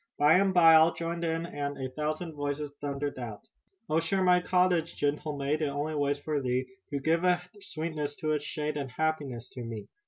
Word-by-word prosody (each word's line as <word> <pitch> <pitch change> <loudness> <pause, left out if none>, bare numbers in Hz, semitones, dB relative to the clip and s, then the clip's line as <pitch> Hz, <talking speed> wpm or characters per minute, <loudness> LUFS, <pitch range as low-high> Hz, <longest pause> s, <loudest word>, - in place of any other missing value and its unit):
By 150 +5 +6
and 195 -1 +3
by 170 -3 +7
all 160 +1 +6
joined 170 0 -3
and 160 -4 -2
a 130 -1 -4
thousand 155 +4 -3
voices 145 0 -3
thundered 145 -1 -3
out: 115 -4 -6 0.5
"Oh, 155 0 +2
share 185 +4 0
my 180 -1 +5
cottage, 180 -2 +2
gentle 145 +1 -1
maid, 140 +3 0
It 155 - +1
only 145 +2 -2
waits 145 -1 +1
for 145 0 -2
thee 125 0 0 0.2
To 140 - -2
give 165 +5 +1
a 180 -1 +4 0.2
sweetness 155 -6 -4
to 155 +1 -2
its 150 -1 0
shade 150 0 -3
And 140 -2 -3
happiness 140 -4 -2
to 125 - -8
me. 115 -2 -6
150 Hz, 195 wpm, -29 LUFS, 145-165 Hz, 0.5 s, by